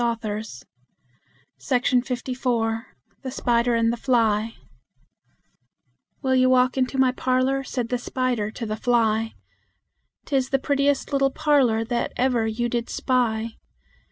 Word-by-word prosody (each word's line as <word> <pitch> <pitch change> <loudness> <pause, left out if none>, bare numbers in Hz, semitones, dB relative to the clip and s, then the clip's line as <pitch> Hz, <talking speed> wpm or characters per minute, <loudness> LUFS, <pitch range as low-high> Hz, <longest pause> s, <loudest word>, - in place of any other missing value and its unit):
ROBERT 230 -1 -1
LOUIS 210 - -5 1.0
STEVENSON 250 -1 +2 1.2
THE 265 - -5
SPIDER 240 -2 +1
AND 230 0 +2
THE - - -4
FLY 225 -3 +1 1.7
"Will 260 -1 +1
you 255 0 +4
walk 255 0 +3
into 260 0 0
my 260 -1 +4
parlor?" 255 +1 0
said 245 -3 -3
the 250 - -1
spider 245 -4 -1
to 230 +2 -6
the 215 0 -3
fly; 225 -1 +1 0.9
"'Tis 265 -3 0
the 270 - +2
prettiest 280 +1 0
little 275 -1 +3
parlor 270 -7 +2
that 240 +1 -2
ever 245 -3 +1
you 235 +2 -1
did 235 0 -2
spy. 230 -3 0
245 Hz, 130 wpm, -24 LUFS, 230-260 Hz, 1.7 s, you